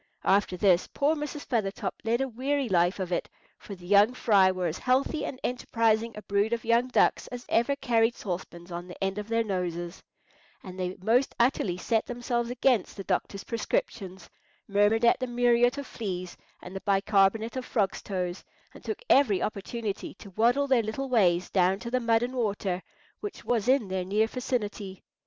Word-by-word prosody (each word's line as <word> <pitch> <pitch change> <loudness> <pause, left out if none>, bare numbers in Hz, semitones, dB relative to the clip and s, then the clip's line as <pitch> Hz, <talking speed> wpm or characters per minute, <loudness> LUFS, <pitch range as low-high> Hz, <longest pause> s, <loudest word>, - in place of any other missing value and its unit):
After 195 -2 +2
this 180 -1 +3
poor 295 +3 +1
Mrs. 295 -1 -5
Feathertop 205 -3 -2
led 235 +2 +1
a 270 - 0
weary 265 +3 -1
life 180 -1 +2
of 185 -1 -3
it; 175 - -1 0.3
for 200 - -9
the 175 -1 -14
young 205 +5 +5
fry 200 -6 +4
were 185 -1 -3
as 165 0 -2
healthy 265 +5 +1
and 255 - -6
enterprising 230 -2 0
a 210 - -8
brood 200 +3 +1
of 230 - -3
young 235 +2 +3
ducks 255 - +2
as 245 0 -8
ever 235 +5 +2
carried 235 -3 +2
saucepans 175 -2 -6
on 175 +1 -6
the 180 - -10
end 195 +1 -1
of 210 - -6
their 230 0 +1
noses, 175 -3 -3 0.6
and 185 -1 -9
they 185 0 -3
most 245 +6 +2
utterly 235 -7 +1
set 225 +4 0
themselves 240 -1 -2
against 245 -5 +1
the 195 - -5
doctor's 200 +1 -2
prescriptions, 190 -4 -3 0.4
murmured 205 +3 +3
at 235 - +4
the 255 - -2
muriate 245 +1 +3
of 280 - -4
fleas 185 -7 -5 0.3
and 180 +2 -9
the 195 - -4
bicarbonate 200 +3 +2
of 260 - -3
frogs' 210 -6 -1
toes, 180 -2 -4 0.3
and - - -14
took - - -5
every 240 -9 +4
opportunity 215 0 -4
to 200 - -13
waddle 240 +8 +2
their 260 -4 +3
little 225 +5 -4
ways 180 -7 +3
down 185 0 +3
to 235 +3 -7
the 255 - +2
mud 230 -1 +2
and 250 +1 -3
water 200 -6 -1 0.4
which 415 - -7
was 235 -2 0
in 260 -5 +3
their 185 -1 -2
near 205 +4 +2
vicinity. 215 -6 -4
220 Hz, 185 wpm, -28 LUFS, 190-245 Hz, 0.6 s, young